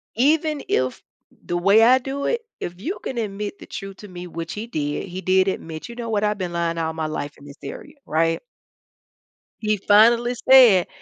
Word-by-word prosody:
even 300 +4 +2
if 130 0 0 0.4
the 175 - -1
way 200 +5 +5
I 255 +3 +7
do 275 +2 -4
it, 475 -1 0 0.2
if 175 +1 -6
you 365 - -4
can 260 - -5
admit 205 -2 -4
the - - -11
truth 195 -1 -8
to 210 - -11
me, 180 -1 -8
which 165 0 -6
he 215 +2 -6
did, 150 -3 -3
he 185 +1 -6
did 190 +1 +3
admit, 160 -2 -4
"You 235 - -9
know 235 -1 -5
what, 210 -1 0
I've 210 0 +1
been 180 -3 -4
lying 170 -1 -1
all 160 -1 -1
my 160 -1 -3
life 145 -1 -5
in 140 - -16
this 140 +1 -12
area," - - -9
right? 165 +1 +1 1.2
He 215 0 +2
finally 230 +5 +4
said, 235 -9 +8
195 Hz, 200 wpm, -22 LUFS, 165-235 Hz, 1.2 s, said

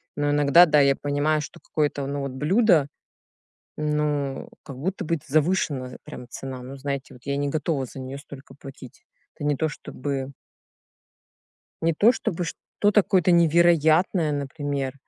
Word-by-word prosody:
Но 145 0 0
иногда, 145 +4 +6
да, 150 -2 +3
я 140 -1 +4
понимаю, 145 +2 0
что - - -9
какое-то, 145 -2 -2
ну 140 0 -3
вот, 140 -1 -4
блюдо, 160 - +3 0.9
ну 150 -2 -1
как 135 -4 -10
будто 190 +5 -3
бы 165 0 -1
завышена 145 -4 0
прям 125 - -9
цена. 130 -2 -7
Ну 135 +2 -9
знаете, 140 -1 -5
вот 125 - -17
я 140 0 -1
не 145 0 -1
готова 145 -2 -1
за 135 - -10
неё 130 +2 -7
столько 140 -2 -12
платить. 135 -3 -13 0.3
Это - - -8
не 145 -1 +1
то 160 +2 0
чтобы 140 -1 -5 1.5
не 165 0 +2
то 215 +9 +5
чтобы 180 -7 -3
что-то 205 +4 +1
какое-то 185 -1 +2
невероятное, 170 0 +4
например, 140 -1 -3
145 Hz, 150 wpm, -24 LUFS, 140-160 Hz, 1.5 s, иногда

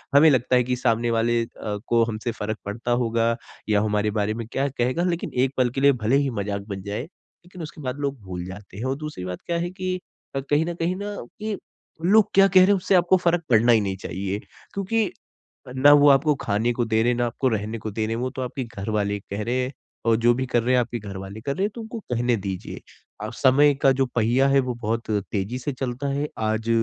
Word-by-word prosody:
हमें 155 +2 +8
लगता 130 -1 +2
है 125 - +4
कि 125 +1 -1
सामने 115 0 +1
वाले 115 +1 +2
को 110 +3 0
हमसे 115 +1 -3
फ़र्क 110 +1 -2
पड़ता 115 +4 -3
होगा। 115 0 +1 0.3
या 105 -1 +3
हमारे 105 0 +1
बारे 105 +1 0
में 115 -1 -5
क्या 140 +1 0
कहेगा 130 +6 0
लेकिन 175 -2 -2
एक 130 +1 +2
पल 125 -1 +3
के 135 - -1
लिए 140 0 +7
भले 130 +5 +4
ही 140 -1 +1
मज़ाक 100 0 -3
बन 95 -1 -4
जाए 100 +2 -3
लेकिन 175 +1 -15
उसके 150 -1 -8
बाद 130 +1 -3
लोग 140 -3 -2
भूल 90 -2 -6
जाते 95 0 -10
हैं। 110 - -5
और 135 +1 0
दूसरी 150 -12 -6
बात 90 -1 -5
क्या 170 -1 0
है 175 +1 -2
कि 185 -1 -3 0.4
अ - - +1
कहीं 150 +2 +3
ना 175 - -3
कहीं 170 +2 -1
ना 205 +1 -5 0.2
कि 215 -1 -3 0.5
लोग 210 +2 +5
क्या 195 0 +7
कह 190 -1 +5
रहे 185 - +6
हैं 205 - +5
उससे 190 0 +1
आपको 180 +1 +5
फ़र्क 175 -1 +1
पड़ना 120 +1 +5
ही 110 -2 +5
नहीं 95 -1 -2
चाहिए। 95 +2 -4 0.3
क्योंकि 200 +1 0 0.6
ना 145 +3 +6
वो 145 0 +7
आपको 145 +2 +5
खाने 110 +3 +1
को 120 0 0
दे 110 0 +2
रहे 120 - +3
हैं 120 - -1
ना, 120 - +1
आपको 130 +3 -1
रहने 110 +1 -2
को 110 0 -5
दे 110 +1 -1
रहे 115 - -2
हैं। 120 - -3
वो 130 - -1
तो 135 -2 -5
आपके 130 +1 -3
घर 105 -3 -7
वाले 100 -1 0
कह 100 +2 -5
रहे 120 +3 -1
हैं। 125 - -3 0.3
और 115 - +4
जो 120 +1 +4
भी 130 +2 -2
कर 120 -2 +1
रहे 125 +2 +2
हैं 125 - +5
आपके 120 0 -4
घर 100 -2 -7
वाले 95 +3 -8
कर 140 +3 -2
रहे 190 - -1
हैं 210 - -2
तो 235 - -6
उनको 225 +1 -6
कहने 120 - 0
दीजिए। 95 -2 -5 0.4
आप 110 +2 -5
समय 140 +3 +5
का 135 - +7
जो 135 - +4
पहिया 120 +4 +3
है 135 0 +5
वो 125 - -1
बहुत 115 +1 -2
तेज़ी 105 +3 -2
से 145 - -3
चलता 130 +2 -3
है। 145 +2 -1
आज 110 +1 -1
120 Hz, 250 wpm, -24 LUFS, 110-145 Hz, 0.6 s, हमें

